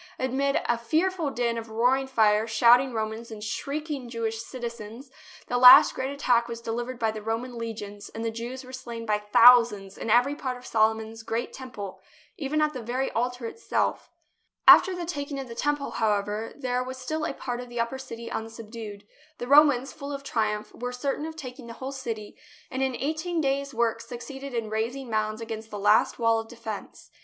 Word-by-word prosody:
Amid 270 +2 +1
a 240 -1 +1
fearful 320 +6 0
din 235 -3 -1
of 225 0 -9
roaring 250 +4 +2
fire, 220 -3 +3
shouting 240 +4 +5
Romans 220 0 -4
and 215 -2 -8
shrieking 280 +3 -4
Jewish 225 -1 -3
citizens, 235 +1 -8 0.3
the 245 - -1
last 255 +4 +10
great 260 +1 -3
attack 245 -4 +2
was 230 -1 -6
delivered 235 +2 -4
by 225 -2 +1
the 215 0 -7
Roman 230 +3 -3
legions 210 -3 -6
and 225 +1 -6
the 225 - 0
Jews 240 +4 -6
were 255 0 -12
slain 235 -3 -7
by 210 -1 +1
thousands 210 -2 +5
in - - -4
every 245 +5 +4
part 260 -4 -4
of 250 - -14
Solomon's 220 0 +1
great 225 +1 -3
Temple, 205 -8 -8 0.3
even 305 +1 -1
at 305 0 0
the 255 - -5
very 250 +4 -2
altar 245 +1 -2
itself. 455 - -2 0.6
After 375 -1 +9
the 350 -1 -4
taking 285 -4 -4
of 270 - -6
the 235 - -8
Temple, 290 +4 -1
however, 210 +1 -1
there 250 -2 -1
was 260 +1 -7
still 305 +5 -3
a - - -1
part 245 -1 -4
of 245 - -10
the 240 0 -5
upper 235 +3 -1
city 235 -3 -8
unsubdued. 220 -2 -7 0.3
The 245 - -5
Romans, 280 -2 +5
full 280 -1 -7
of 280 -1 -5
triumph, 215 -4 -2
were 245 +1 -5
certain 275 +4 -2
of 320 - -8
taking 255 -4 -9
the 230 - -7
whole 260 +3 -6
city, 230 -6 -6 0.4
and 260 0 -3
in 265 -1 0
eighteen 315 +5 -2
days' 275 -1 0
work 230 -2 0
suc 235 +1 -8
ceeded 270 -1 -7
in 230 -2 -1
raising 235 +4 -3
mounds 215 0 -1
against 225 -1 -6
the 210 - -6
last 205 +2 +3
wall 230 -1 +3
of 225 - -6
defence. 225 -3 -8
240 Hz, 195 wpm, -26 LUFS, 225-265 Hz, 0.6 s, last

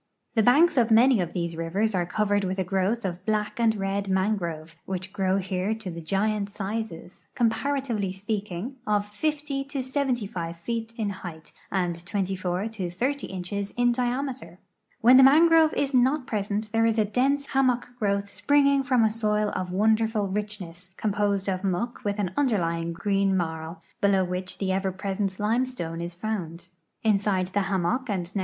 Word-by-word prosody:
The 225 - +3
hanks 310 +4 +5
of 235 -2 +4
many 235 0 +5
of 170 -1 -3
these 170 -2 -2
rivers 190 +7 -1
are 175 -2 0
covered 205 +1 +1
with 190 0 -2
a 190 - +1
growth 195 +5 0
of 180 -1 -4
black 210 +1 -1
and 225 -2 +3
red 195 0 -2
mangrove, 175 -5 -1
which 190 0 -5
grow 190 -1 +1
here 190 +2 -1
to 220 -5 -7
the 170 0 -7
giant 200 +4 0
sizes, 200 -3 -6
comparatively 235 -3 0
speaking, 205 +4 -4
of 205 -1 +2
50 285 +5 -2
to 275 -2 -4
75 240 - -2
feet 225 +5 -4
in 210 -3 -1
height 175 -4 -9 0.2
and 175 -3 -1
24 185 +1 -2
to 210 -5 -4
ffO 255 +11 -2
inches 195 +2 -4
in 245 0 +3
diame 250 +2 -1
ter. 180 -8 -13 0.5
W - - +1
hen 255 - +9
the - - +9
mangrove 320 +3 +6
is 280 -1 0
not 260 +3 +3
present 210 0 -2
there 225 0 +3
is 225 0 +1
a 215 - +3
dense 275 +6 +1
hammock 255 -3 +1
growth 200 -1 0
springing 280 -1 +3
IVom 250 -4 +3
a 215 - +2
soil 210 -1 0
of 180 -1 -3
wonderful 220 +1 +2
richness, 190 -3 -5
composed 205 -2 0
of 185 0 -1
muck 200 +6 -2
with 205 0 -1
an 195 -4 -1
underlying 170 -11 0
green 195 +2 +1
marl, 160 -1 -4 0.2
below 195 -2 +4
which 180 +1 -4
the 195 - -2
cver 190 0 -1
])resent 195 -1 -2
limestone 210 -7 -1
is 170 0 -5
found. 175 -4 -4 0.3
Inside 200 -4 +2
thi! 205 - 0
hammock 195 +7 0
and 190 -4 -1
nc. 195 +3 -4
205 Hz, 175 wpm, -26 LUFS, 185-230 Hz, 0.5 s, hen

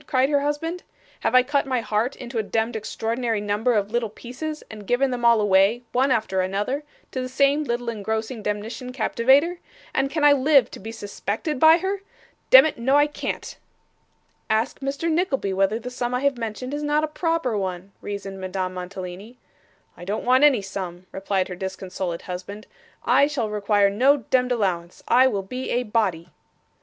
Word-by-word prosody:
cried 260 +1 +2
her 285 - +4
husband. 325 +5 -2 0.4
'Have - - 0
I 255 - +7
cut 280 +1 0
my 255 -2 +1
heart 220 +4 -1
into 240 -2 -5
a - - 0
demd 225 +2 -1
extraordinary 225 +1 -2
number 210 +4 0
of 205 -1 0
little 235 -2 0
pieces, 270 +8 -7
and 210 -2 -11
given 255 +2 +2
them 245 -1 -4
all 235 -1 +5
away, 205 +3 +3
one 260 +3 +2
after 215 -6 +1
another, 205 +10 -2 0.3
to 260 - -3
the 255 - -4
same 280 +3 +2
little 240 -1 -2
engrossing 220 +1 -3
demnition 210 +5 -4
captivater, 270 +8 +2 0.3
and 270 0 +1
can 310 +1 -2
I 290 -1 +8
live 275 -1 +4
to - - -9
be 220 +3 -7
suspected 220 - -4
by 320 +3 +7
her? 385 +2 -2 0.5
Demmit, 265 +1 +7
no 265 +4 +2
I 290 0 +6
can't.' 295 - -5 0.9
'Ask 220 +4 0
Mr. 275 +4 -3
Nickleby 310 - 0
whether 195 +3 +1
the 250 +2 -7
sum 245 0 -2
I 250 - -1
have 280 -1 +2
mentioned 240 +3 -5
is 295 - -3
not 295 +1 +1
a - - +1
proper 320 -6 -1
one,' 190 -1 -4
reasoned 195 -1 -6
Madame 185 0 -3
Mantalini. 185 +5 -7 0.6
'I 175 - -10
don't 205 +3 -3
want 255 +3 +4
any 265 -8 +5
sum,' 185 -2 -6
replied 190 -1 -1
her 180 - -6
disconsolate 185 -2 -5
husband; 190 +3 -7 0.4
'I 265 +4 +5
shall 250 -8 -2
require 205 -1 +2
no 260 +8 +4
demd 255 -2 0
allowance. 185 -7 -2
I 255 +2 +6
will 200 -6 -1
be 255 +7 -5
a 245 - +1
body. 195 -7 -1
235 Hz, 180 wpm, -23 LUFS, 200-270 Hz, 0.9 s, I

